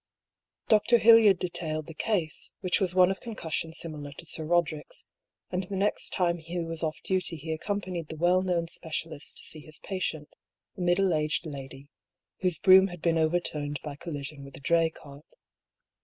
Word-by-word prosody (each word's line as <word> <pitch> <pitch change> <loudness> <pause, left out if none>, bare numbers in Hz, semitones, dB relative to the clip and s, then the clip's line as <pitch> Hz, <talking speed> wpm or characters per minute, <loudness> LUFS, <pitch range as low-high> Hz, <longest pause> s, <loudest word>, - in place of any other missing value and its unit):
Dr. 225 +2 +5
Hildyard 225 -4 +7
detailed 160 -3 -2
the 165 - -9
case, 175 -4 -1
which 185 - +2
was 185 -2 +1
one 185 0 +6
of 195 - -4
concussion 165 -8 -3
similar 150 -3 -4
to 170 - -11
Sir 160 0 0
Roderick's; 160 -2 -1 0.5
and 180 +1 -1
the 195 - -5
next 200 +2 +1
time 175 -2 0
Hugh 165 +1 -4
was 165 0 -4
off 155 -2 -2
duty 185 -2 0
he 160 +1 -6
accompanied 180 -1 -3
the 160 - -7
well 175 +3 +3
known 175 -3 0
specialist 160 -2 -4
to - - -7
see 155 - -2
his 155 0 -4
patient, 165 -6 -4 0.5
a 190 - -7
middle 180 +1 +3
aged 155 +2 0
lady, 135 -2 -8 0.5
whose 180 -3 +1
brougham 190 0 +7
had 175 -3 -10
been 165 -1 +2
overturned 155 -3 0
by 150 -2 -5
collision 145 -2 -6
with 140 0 -11
a - - -13
dray 165 +3 +3
cart. 145 -2 -14
165 Hz, 175 wpm, -28 LUFS, 155-185 Hz, 0.5 s, Hildyard